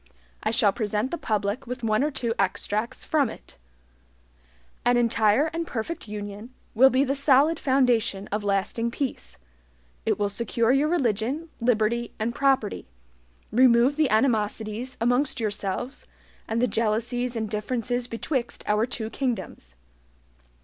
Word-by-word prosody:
I 215 - 0
shall 220 -3 +3
present 215 +3 -1
the 340 - -2
public 210 +2 -2
with 250 0 -5
one 215 +2 +2
or 300 - +1
two 240 -5 -2
extracts 210 +5 -1
from 290 -6 +2
it: - - -12 1.2
"An 245 0 +3
entire 230 +5 +3
and 335 0 -3
perfect 235 +5 -4
union 210 +3 -7 0.2
will 265 +4 +7
be 265 +1 +3
the 275 0 0
solid 280 +3 +3
foundation 240 -7 +2
of 210 +1 -2
lasting 205 +3 0
peace: 260 - -4 0.7
It - - +1
will 205 - +1
secure 230 +2 0
your 275 +3 +3
religion, 275 - 0
liberty, 235 0 0
and 225 +2 -2
property; 265 -5 +1 0.6
remove 250 +2 +5
the 310 -3 +2
animosities 220 +1 0
amongst 245 +5 +1
yourselves, 210 +3 -3 0.4
and 225 +1 -1
the 250 - +3
jealousies 230 +3 -1
and 220 -1 -2
differences 240 +3 -2
betwixt 240 +2 -3
our 210 +2 +2
two 225 -3 -4
kingdoms. 235 - -4
235 Hz, 135 wpm, -25 LUFS, 215-260 Hz, 1.2 s, will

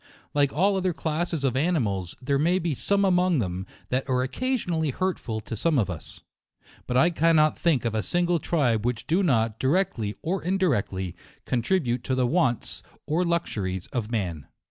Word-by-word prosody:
Like 145 -1 +3
all 195 +6 +2
other 185 -1 0
classes 160 -1 -2
of 130 -2 +1
animals, 115 - 0
there 140 +2 0
may 170 +5 +3
be 170 -4 -1
some 200 +8 +2
among 180 -2 +3
them 95 -4 -2 0.2
that 130 +2 -1
are 125 -1 +2
occasionally 175 - -1
hurtful 135 -8 -2
to 115 - -6
some 155 +7 +1
of 100 -6 +1
us; 80 -3 -8 0.7
but 125 - +1
I 170 +6 +5
cannot 160 -2 +3
think 155 -8 +1
of 115 - 0
a 110 - 0
single 175 +5 +1
tribe 125 -9 +1
which 120 -1 -2
do 175 +5 +2
not, 115 - +1
directly 135 - 0
or 180 +3 -1
indirectly, 120 - 0 0.3
contribute 125 -1 0
to 130 - 0
the 130 -1 +2
wants 130 -4 +1 0.2
or 165 +4 +1
luxuries 105 - -1
of 115 -4 -2
man. 90 - -3
140 Hz, 170 wpm, -26 LUFS, 115-175 Hz, 0.7 s, I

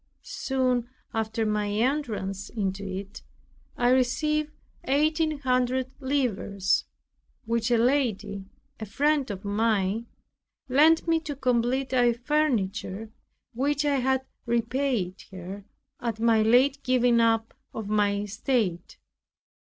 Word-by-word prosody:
Soon 255 -2 -1 0.2
after 220 0 -1
my 210 -1 0
entrance 210 -4 -1
into 195 -2 -3
it 195 +1 -6 0.6
I 245 0 +3
received 300 +4 +1 0.4
eighteen 310 +2 +1
hundred 255 0 +1
livres, 225 -8 0 0.6
which 230 0 0
a 240 - +4
lady, 220 -6 0 0.3
a 220 - -6
friend 285 +5 +1
of 200 0 -6
mine, 210 +1 0 0.6
lent 310 +6 +4
me 330 -1 +3
to 300 -2 -6
complete 255 0 0
our 245 -2 +4
furniture, 230 -6 -1 0.4
which 285 +4 0
I 285 -1 +2
had 265 0 +1 0.2
repaid 235 -5 -1
her 190 +2 -8 0.3
at 230 -3 -3
my 225 -1 +4
late 255 +5 +4
giving 245 -2 +3
up 225 -1 +2 0.2
of 220 -2 -6
my 205 -1 +2
estate. 210 -4 -2
235 Hz, 115 wpm, -26 LUFS, 210-265 Hz, 0.6 s, a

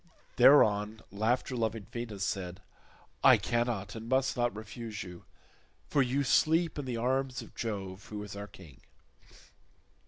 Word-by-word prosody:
Thereon 110 -5 +5
laughter 115 +6 0
loving 110 -3 -2
Venus 110 -5 -4
said, 90 -1 -4 0.6
"I - - +8
cannot 120 -4 -1
and 115 0 -8
must 130 +1 +2
not 120 -3 0
refuse 110 0 -6
you, 90 -2 -11 0.6
for 145 - +3
you 135 +2 +1
sleep 160 +4 +2
in 145 - -4
the 125 -2 -3
arms 130 +2 -1
of - - -15
Jove 100 -4 -5
who 105 -1 -6
is 105 -1 -8
our 100 0 -6
king." 85 -8 -15
115 Hz, 145 wpm, -31 LUFS, 100-125 Hz, 0.6 s, I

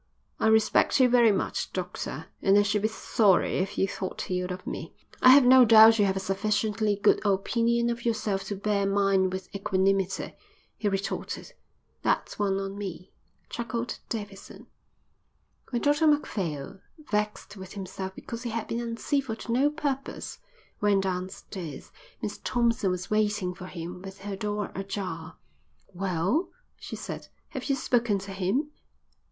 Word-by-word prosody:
"I - - +2
respect 220 +4 +4
you 255 - +7
very 240 -2 +5
much, 195 - -2
doctor, 175 -4 -4 0.2
and 195 +1 +5
I 205 - +6
should 205 0 +1
be 215 - +2
sorry 215 -3 +2
if 190 +1 -2
you 195 - +2
thought 190 -1 -5
ill 180 0 -1
of 185 0 -6
me." - - -6 0.3
"I 255 - +8
have 265 0 +8
no 255 +1 +8
doubt 225 -1 +8
you 205 - +5
have 190 -1 +1
a - - -1
sufficiently 210 +2 0
good 205 +1 +3
opinion 235 +4 +1
of 235 0 -5
yourself 215 -4 -1
to 205 - -3
bear 200 0 0
mine 195 -1 +3
with 185 0 -6
equanimity," 195 -1 0 0.4
he 210 - -1
retorted. 195 0 -4 0.5
"That's - - 0
one 195 -1 +1
on 195 +1 -5
me," 185 -2 -6 0.4
chuckled 235 0 -4
Davidson. 205 -3 -7 1.0
When 240 -2 -2
Dr 295 +2 +3
Macphail, 190 - -1 0.3
vexed 210 -1 -2
with 190 -2 -9
himself 190 -1 -6
because 230 0 -7
he 245 - -4
had 225 -1 -3
been 230 - -2
uncivil 235 +1 -1
to 230 - -6
no 265 +5 +3
purpose, 285 -3 -4 0.4
went 200 -2 +3
downstairs, 180 -4 -5 0.3
Miss 210 0 -4
Thompson 235 -5 +1
was 180 +1 -3
waiting 210 -3 +1
for 180 +1 -9
him 180 0 -7
with 195 0 -10
her 200 0 -4
door 210 +1 -3
ajar. 185 -4 -5 0.6
"Well," 190 - 0 0.3
she - - -7
said, - - -7 0.2
"have - - -6
you 275 - +1
spoken 240 -5 +1
to 195 0 -7
him?" 200 +11 -1
205 Hz, 155 wpm, -27 LUFS, 190-230 Hz, 1.0 s, I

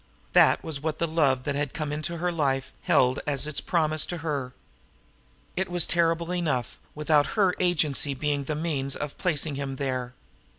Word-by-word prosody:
That - - +5
was 155 -4 -4
what 155 0 -2
the 170 - +1
love 145 -6 +2
that 145 - -1
had 145 -1 -2
come 150 -2 -2
into 155 +3 -2
her 175 +2 0
life 135 -5 -1
held 125 +1 +3
as 145 -1 0
its 150 -1 -2
promise 155 -3 +1
to 175 - -3
her! 140 -5 -2 1.0
It 190 0 -1
was 175 -2 +3
terrible 170 +1 +1
enough 150 -9 -1 0.2
without 150 -1 +3
her 190 -3 +4
agency 155 -6 +1
being 145 0 -1
the 155 - -2
means 145 -4 -2
of 150 -1 -5
placing 160 -4 0
him 135 -1 -4
there! 130 -2 -3
150 Hz, 175 wpm, -27 LUFS, 140-165 Hz, 1.0 s, That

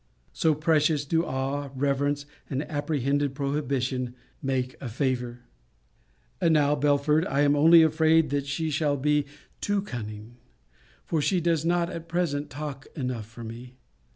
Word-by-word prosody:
So 160 -2 +2
precious 155 -1 +2
do 165 +3 +1
awe, 140 -1 -2
reverence, 140 +1 0 0.2
and 135 +2 -1
apprehended 145 -2 -1
prohibition, 135 -3 -1 0.3
make 130 -2 -1
a 130 - -4
favour! 125 -1 -2 1.0
And 165 -1 +4
now, 145 -1 +4
Belford, 150 +2 +2
I 140 +1 +1
am 145 0 +4
only 165 +3 +7
afraid 160 0 +3
that 140 -1 0
I 150 +3 -2
shall 145 -1 +1
be 150 +1 +1 0.3
too 205 -1 0
cunning; 110 - -7 0.7
for 160 -3 0
she 185 +5 +2
does 165 -2 +1
not 175 0 +1
at 165 -1 -7
present 150 -4 -1
talk 140 -1 -6
enough 125 -6 -3
for 115 +1 -11
me. 120 +3 -9
145 Hz, 145 wpm, -27 LUFS, 130-155 Hz, 1.0 s, only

